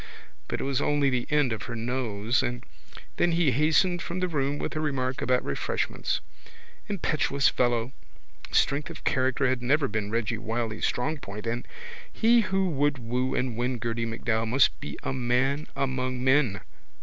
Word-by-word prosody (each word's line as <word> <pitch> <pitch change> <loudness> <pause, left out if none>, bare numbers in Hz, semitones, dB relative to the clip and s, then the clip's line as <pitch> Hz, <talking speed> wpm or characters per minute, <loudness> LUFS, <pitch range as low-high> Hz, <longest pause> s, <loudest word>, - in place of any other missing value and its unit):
but - - -3
it - - -2
was 135 0 0
only 145 -2 +2
the 125 -1 -1
end 150 -5 +2
of 110 - -5
her 120 - -3
nose 115 -1 0
and 120 0 -3 0.5
then 175 - +3
he 165 -5 +3
hastened 160 +6 +3
from 175 +2 -4
the 185 - +1
room 145 -3 -1
with - - -4
a - - -1
remark 135 -4 -1
about 125 0 +1
refreshments. - - -1 0.7
Impetuous 155 -7 +1
fellow! 120 0 +1 0.6
Strength 140 +1 +2
of - - -9
character 130 +1 +2
had 130 -1 0
never 140 +3 +2
been 105 -1 -2
Reggy 115 0 -1
Wylie's 115 -1 -1
strong 150 +5 -1
point 105 -1 -7
and 120 +2 -2 0.4
he 230 +1 +4
who 190 -1 +1
would 145 -2 +1
woo 125 +2 -1
and 125 -2 -1
win 125 +2 -1
Gerty 115 0 -2
MacDowell 115 0 -1
must 135 +5 +3
be - - -6
a - - -2
man 130 +3 +1
among 130 -2 -1
men. 130 -6 +3
130 Hz, 170 wpm, -27 LUFS, 120-145 Hz, 0.7 s, he